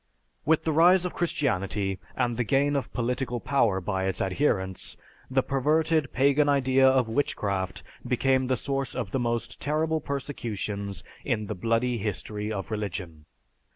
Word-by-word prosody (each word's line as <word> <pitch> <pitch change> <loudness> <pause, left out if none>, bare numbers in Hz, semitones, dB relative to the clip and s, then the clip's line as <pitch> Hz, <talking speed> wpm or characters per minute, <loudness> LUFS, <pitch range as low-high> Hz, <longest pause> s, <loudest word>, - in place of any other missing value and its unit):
With 160 +1 +3
the 160 - +1
rise 175 +4 +5
of 180 - -3
Christianity 100 - -1 0.2
and 120 -1 0
the 125 - 0
gain 140 +5 +2
of 140 - -2
political 125 0 -1
power 115 -8 +2
by 95 0 -2
its 95 - -2
adherents, 95 -3 -1 0.3
the 130 0 +2
perverted 155 +2 +1
pagan 140 +3 +3
idea 135 -1 +4
of 130 -3 +3
witchcraft 100 -7 -1 0.2
became 130 0 +2
the 130 -1 +1
source 135 +1 -3
of 95 - -3
the 135 - 0
most 120 -1 -2
terrible 155 +2 0
persecutions 105 -9 -4 0.2
in 110 -5 -1
the - - -3
bloody 115 +5 0
history 105 +1 -3
of 95 0 -4
religion. 90 -7 -4
125 Hz, 150 wpm, -27 LUFS, 100-140 Hz, 0.3 s, rise